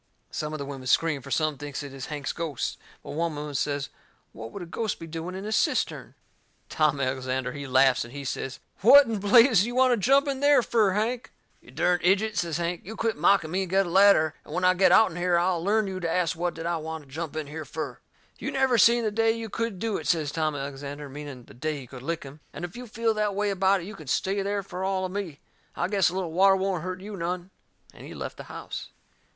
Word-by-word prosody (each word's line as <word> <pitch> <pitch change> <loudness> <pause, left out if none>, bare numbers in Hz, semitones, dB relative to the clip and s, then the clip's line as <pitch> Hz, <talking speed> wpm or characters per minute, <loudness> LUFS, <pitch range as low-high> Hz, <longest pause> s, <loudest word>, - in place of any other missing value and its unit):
Some 150 0 -3
of 155 - -4
the 140 - -5
women 135 -2 -7
scream, 150 +1 +2
for - - -11
some 155 -3 0
thinks 145 -1 -5
it 140 -2 -8
is 135 -2 -7
Hank's 145 -2 -4
ghost. 160 -6 -3 0.2
But - - -8
one 165 0 -1
woman 150 0 -5
says 145 0 -1 0.4
what 115 +1 -8
would 195 - -7
a - - -7
ghost 215 +5 -3
be 165 - -7
doing 165 +3 -6
in 190 +2 -6
a 215 - -4
cistern? - - 0 0.5
Tom 150 -3 +2
Alexander, 130 -1 -1
he 140 +1 -7
laughs 130 0 +4
and 120 - -11
he 140 +1 -7
says: 135 +1 -4 0.2
"What 275 +8 +8
in 225 -3 -2
blazes 220 0 +6
you 240 - -5
want 255 0 +5
to - - +1
jump 275 +7 +3
in 275 -1 -1
there 285 -2 +5
fur, 215 -6 +2
Hank?" 235 +6 -1 0.3
"You - - -18
dern 180 0 +1
ijut!" 205 +4 +2
says 170 -4 -1
Hank, 170 0 -2
"you 220 +4 -8
quit 225 0 -1
mocking 165 0 +3
me 190 +2 0
and 190 - -3
get 195 +1 +3
a - - -5
ladder, 190 -5 +5
and - - -8
when 180 - -1
I 180 - +6
get 185 -1 +4
out'n 185 -3 +5
here 175 0 +2
I'll 175 -1 +1
learn 215 +3 +2
you 190 -1 -4
to 170 -2 -2
ast 170 -1 +1
what 175 +1 -2
did 165 - -6
I 170 0 0
want 160 0 -6
to - - -20
jump 160 +1 -5
in 155 -1 -3
here 155 +2 -6
fur!" 155 +1 -6 0.4
"You - - -3
never 265 -3 +2
seen 235 +2 +5
the 215 - 0
day 225 +1 +3
you 225 -1 -6
could 230 -2 -3
do 220 +2 -1
it," - - -6
says 155 -4 +1
Tom 155 -1 -1
Alexander, 140 +1 -6
meaning 140 -2 -8
the - - -16
day 150 +3 -3
he 130 - -9
could 125 0 -11
lick 165 +4 -3
him. 140 +2 -11
"And - - -5
if 175 - -10
you 245 0 -8
feel 225 +1 0
that 210 -2 -1
way 205 0 0
about 195 0 +2
it - - -8
you 210 - -8
can 155 -8 -12
stay 195 +9 0
there 200 0 -1
fur 185 -1 -6
all 190 -1 0
of 185 - -5
me. 185 -7 -5 0.3
I - - 0
guess 195 -2 +3
a 180 - -7
little 185 -4 -2
water 195 +3 +5
won't 190 -2 -1
hurt 185 +1 -5
you 205 +1 -7
none." 180 +1 -4 0.4
And - - -13
he - - -9
left - - -6
the - - -9
house. - - -7
175 Hz, 255 wpm, -26 LUFS, 150-205 Hz, 0.5 s, What